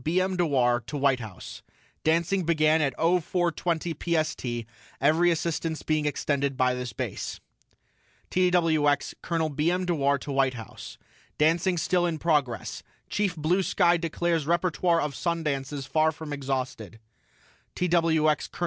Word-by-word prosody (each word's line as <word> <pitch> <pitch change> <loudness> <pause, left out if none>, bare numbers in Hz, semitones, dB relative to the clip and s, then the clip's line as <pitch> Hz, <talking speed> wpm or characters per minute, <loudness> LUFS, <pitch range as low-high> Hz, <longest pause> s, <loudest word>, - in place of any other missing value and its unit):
B. 170 +4 +1
M. 185 0 0
DEWAR 130 -8 +2
TO 150 - -4
WHITE 135 -2 +2
HOUSE: 110 -6 -9 0.4
DANCING 170 +4 +2
BEGAN 155 -1 +3
AT 140 -4 0
OH 170 +3 +3
FOUR 175 +1 0
TWENTY 165 +1 -2 0.3
PST 120 -6 -4 0.3
EVERY 160 +5 +4
ASSISTANCE 165 -1 -2
BEING 155 -1 0
EXTENDED 140 -2 -1
BY 130 0 +3
THIS 125 -1 -4
BASE - - -5 0.9
TWX 165 -5 +2
COL. 165 -2 -1
B. 150 +3 0
M. 180 +1 0
DEWAR 140 -5 +1
TO 140 +1 -7
WHITE 135 -1 +2
HOUSE: 115 -3 -9 0.4
DANCING 170 +4 +2
STILL 175 +1 +1
IN 165 -2 -2
PROGRESS 145 -7 -1 0.3
CHIEF 200 -3 0
BLUE 165 +5 +1
SKY 175 -2 +3
DECLARES 165 -2 -1
REPERTOIRE 170 0 +2
OF 150 -1 -2
SUN 170 +1 -2
DANCES 140 -1 -3
FAR 155 +2 +2
FROM 155 -1 -7
EXHAUSTED 130 -6 -4 0.8
TWX 165 -3 +2
COL. - - -13
155 Hz, 145 wpm, -27 LUFS, 140-170 Hz, 0.9 s, EVERY